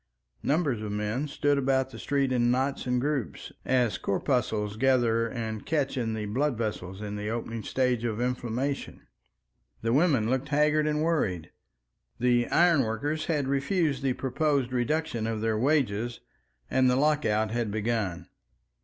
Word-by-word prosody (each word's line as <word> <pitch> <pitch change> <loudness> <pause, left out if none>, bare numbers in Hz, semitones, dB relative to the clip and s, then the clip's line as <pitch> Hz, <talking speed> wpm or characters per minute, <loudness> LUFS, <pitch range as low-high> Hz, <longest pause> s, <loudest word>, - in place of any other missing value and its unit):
Numbers 145 -7 0
of 105 -1 -4
men 105 +7 -2
stood 145 0 +1
about 130 -1 +1
the - - -9
streets 140 -2 0
in 120 -1 +2
knots 130 +2 0
and 125 0 +1
groups, 140 -2 -3
as 125 -4 +1
corpuscles 105 -2 0
gather 120 -2 +3
and 110 -3 -4
catch 145 -4 0
in 115 -4 -1
the 105 -1 -3
blood 130 +5 0
vessels 105 -3 -4
in 105 0 -4
the 105 +1 -3
opening 115 0 -4
stages 125 -1 0
of 110 -2 -2
inflammation. 125 +2 -2 0.8
The 115 0 +1
women 140 -7 +3
looked 130 +3 -1
haggard 150 +1 +3
and 150 0 0
worried. 95 - 0 0.7
The 120 -1 +2
ironworkers 155 -2 +2
had 150 -5 0
refused 140 +1 0
the 135 -2 +1
proposed 135 0 0
reduction 125 -2 -1
of 115 -1 -2
their 110 0 0
wages, 120 -4 +1 0.5
and 130 -1 +3
the 125 - +3
lockout 130 -7 +2
had 120 -1 -1
begun. 105 -5 -2
125 Hz, 150 wpm, -28 LUFS, 110-140 Hz, 0.8 s, gather